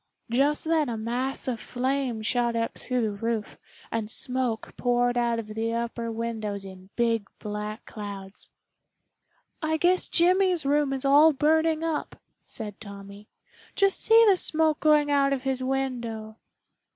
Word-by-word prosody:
Just 280 +5 +2
then 315 -4 +2
a 230 - -3
mass 245 +5 -2
of 240 -3 -2
flame 255 -2 -2
shot 240 +1 +1
up 230 0 -1
through 250 -1 -2
the 215 - 0
roof, 220 +1 -3 0.3
and 225 -2 -2
smoke 250 -2 -2
poured 245 0 +1
out 235 -1 +1
of 220 -2 -5
the 225 +1 -1
upper 235 0 -3
windows 220 -3 -4
in 190 0 -12
big 230 -3 0
black 210 +1 -5
clouds. 200 -2 -7 1.1
"I 315 0 0
guess 360 +3 +2
Jimmy's 360 -1 +3
room 290 0 +2
is 270 0 -3
all 295 +3 +6
burning 315 +3 +2
up," 320 -2 -2 0.3
said 210 -2 -4
Tommy. 200 0 -11 0.5
"Just 395 -1 +3
see 455 +1 +6
the 390 -3 +5
smoke 315 -2 +2
going 300 -1 +4
out 275 -1 +3
of 260 -2 -3
his 265 -1 -1
window." 240 -5 -3
245 Hz, 150 wpm, -26 LUFS, 220-295 Hz, 1.1 s, all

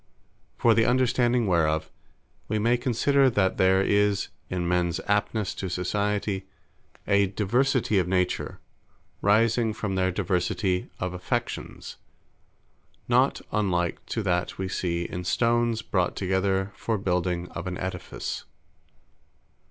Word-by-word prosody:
For 115 - +4
the 115 0 +3
understanding 125 -1 +2
whereof, 80 -4 +1 0.6
we 110 - 0
may 115 +3 +3
consider, 130 +3 +3
that 100 -5 +1
there 95 +1 +4
is 100 0 +2 0.2
in 90 -1 -2
mens 90 -1 +1
aptnesse 105 0 0
to 95 - -3
Society; 100 +2 -1 0.6
a 100 0 +4
diversity 110 +2 +1
of 90 - 0
Nature, 90 -1 -1 0.6
rising 110 +2 +3
from 105 -3 -3
their 95 -1 +1
diversity 90 0 -1
of 90 0 -2
Affections; 90 0 -4 1.1
not - - +3
unlike 90 -5 0
to 110 - -2
that 90 -2 -1
we 95 - -2
see 85 -2 -1
in 90 +1 -5
stones 115 +4 +1
brought 90 -2 0
together 95 +1 0
for 115 -1 -1
building 90 -2 -1
of 85 +2 -6
an 90 -1 -3
Aedifice. 95 0 -5
95 Hz, 120 wpm, -26 LUFS, 90-110 Hz, 1.1 s, For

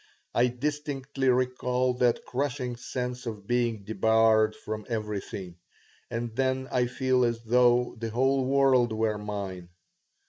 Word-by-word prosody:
I 120 +1 +4
distinctly 135 0 -2
recall 125 0 +1
that 120 -2 +2
crushing 125 -2 -2
sense 125 0 -5
of 105 -3 -6
being 120 -3 0
debarred 110 0 +3
from 110 0 -6
everything, 105 -5 -4 0.5
and 115 -1 -4
then 130 0 0
I 125 -1 +2
feel 130 0 +1
as 115 -1 -1
though 125 +1 +3
the 115 0 -3
whole 130 +4 +2
world 130 -4 +3
were 110 -1 0
mine. 100 -4 -5
120 Hz, 130 wpm, -28 LUFS, 110-130 Hz, 0.5 s, I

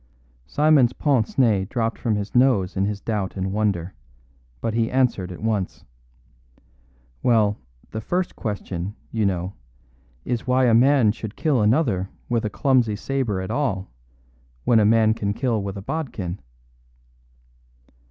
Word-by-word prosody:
Simon's 145 - +4
pince 135 -7 0
nez 105 -7 +3
dropped 115 0 -2
from 110 -3 0
his 105 0 -4
nose 120 -7 +3
in 95 0 +1
his 105 0 -2
doubt 100 -3 -3
and 95 0 -2
wonder, 100 -4 -1 0.7
but 110 - -2
he 115 0 +1
answered 120 -8 +1
at 90 - -9
once. 105 -4 -2 1.4
"Well, 110 -4 +2 0.3
the 110 - -4
first 180 +10 -2
question, 100 -2 -4 0.2
you 110 -3 +1
know, 90 0 -2 0.7
is 120 0 -2
why 130 0 +3
a 120 - +4
man 125 -1 +5
should 110 -1 -7
kill 145 -7 +1
another 105 - +2 0.2
with 120 -1 +1
a 110 - -1
clumsy 125 -2 +2
sabre 110 -3 -2
at 95 - -5
all 100 - -1 0.7
when 115 - +4
a 105 - +4
man 110 0 +4
can 100 -2 -2
kill 115 -3 0
with 100 0 -5
a 100 - -7
bodkin?" 100 - -4
110 Hz, 145 wpm, -23 LUFS, 100-125 Hz, 1.4 s, man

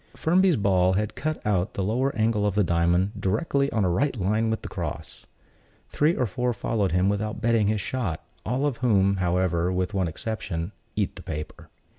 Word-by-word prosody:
Firmby's 180 +1 +3
ball 95 -3 +3
had 105 +2 -1
cut 155 +1 -3
out 100 -2 0
the 100 - -1
lower 125 +7 +1
angle 110 -1 +1
of 105 -2 0
the 105 - +4
diamond, 85 +2 +2
directly 140 - 0
on 110 -4 +1
a - - +2
right 130 +6 0
line 110 +4 +1
with 110 - -2
the - - -5
cross. - - -6 0.6
Three 155 +4 +2
or 125 - +1
four 125 +4 -1
followed 105 -2 -1
him 90 +2 +2
without 105 +1 -1
bettering 115 -2 +2
his 105 -1 0
shot; 95 -6 -3 0.2
all 125 +6 -1
of 140 -5 -1
whom, 100 -5 +3
however, 90 -1 +1
with 90 +2 -1
one 95 -3 +1
exception, 90 -1 -4 0.2
"eat - - -1
the - - -8
paper." 75 -1 -7
105 Hz, 190 wpm, -25 LUFS, 95-115 Hz, 0.6 s, the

